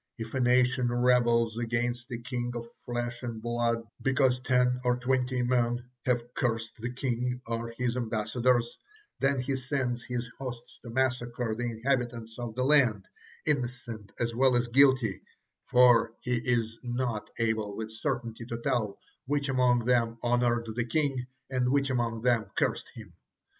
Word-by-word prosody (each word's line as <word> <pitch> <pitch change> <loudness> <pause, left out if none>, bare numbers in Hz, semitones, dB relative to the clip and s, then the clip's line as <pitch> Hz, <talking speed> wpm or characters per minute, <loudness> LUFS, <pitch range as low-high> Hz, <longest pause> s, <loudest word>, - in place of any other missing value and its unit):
If 115 -1 -6
a 130 - 0
nation 125 0 +3
rebels 120 -2 +3
against 120 +1 -1
a 120 - -3
king 120 0 -4
of 120 0 -4 0.2
flesh 120 0 -3
and 120 -3 -5
blood 120 0 0 0.2
because 130 -1 +3
ten 125 0 +2
or 125 -1 +2
twenty 125 0 0
men 120 0 0 0.2
have 120 -1 0
cursed 115 -2 -1
the 120 +2 -3
king 125 -1 -2
or 115 0 -4
his 125 -1 0
ambassadors, 120 +1 0 0.4
then 135 0 +2
he 135 +2 -1
sends 130 -2 -2
his 125 0 -4
hosts 125 -3 -7
to 120 - -9
massacre 120 -2 0
the 120 +2 -3
inhabitants 120 -1 -2
of 120 -2 -5
the 130 - 0
land, 130 -8 +3 0.4
innocent 120 -7 -2
as 115 -1 0
well 130 +1 +4
as 120 0 +2
guilty, 130 -5 +4 0.5
for 120 -2 +5
he 125 - -2
is 115 -1 0
not 120 -3 -2
able 110 -3 -1
with 110 0 -5
certainty 115 +1 -3
to 115 - -4
tell 115 -5 -1 0.3
which 145 0 0
among 125 -2 +3
them 115 -2 +2
honored 120 -1 +2
the 120 +1 -1
king 135 -1 0 0.2
and 125 -1 +1
which 140 0 +2
among 115 -2 -1
them 120 -3 +3
cursed - - 0
him. - - -11
120 Hz, 155 wpm, -29 LUFS, 115-125 Hz, 0.5 s, for